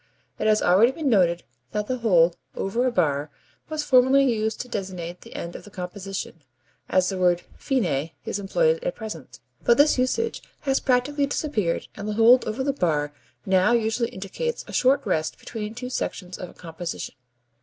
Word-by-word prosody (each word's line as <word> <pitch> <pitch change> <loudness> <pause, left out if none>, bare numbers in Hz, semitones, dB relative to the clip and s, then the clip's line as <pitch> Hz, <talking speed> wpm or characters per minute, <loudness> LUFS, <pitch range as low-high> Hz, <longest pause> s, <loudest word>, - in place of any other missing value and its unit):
It - - +1
has 215 0 +3
already 200 +8 +5
been 285 -1 -1
noted 175 -5 +3 0.3
that 210 0 -1
the 255 +3 -2
hold 175 -7 +4 0.2
over 235 +6 0
a - - +1
bar 150 -7 +1 0.4
was 310 -1 -2
formerly 260 0 +5
used 220 0 -1
to 250 - -8
designate 180 -6 -5
the - - -13
end 170 0 -5
of - - -8
the - - -12
composition, 185 -2 -6 0.5
as 185 -1 +3
the 190 -2 -3
word 175 -1 +3
fine 170 - 0 0.2
is 205 - -2
employed 480 - +1
at - - -2
present, 160 - -8 0.2
but 235 - +4
this 290 -2 +5
usage 355 - 0 0.2
has 270 -2 +1
practically 280 +3 +1
disappeared 220 - -1
and 205 0 -7
the 215 - -1
hold 230 +4 +6
over 235 +5 -2
the 280 0 0
bar 150 - 0 0.3
now 190 +4 +4
usually 230 0 +1
indicates 335 - -4
a - - -9
short 265 +2 +3
rest 160 -5 -1
between 215 -1 -6
two 250 +1 -6
sections 185 -7 -4
of 180 - -6
a - - -15
composition. 170 0 -6
215 Hz, 180 wpm, -25 LUFS, 180-255 Hz, 0.5 s, hold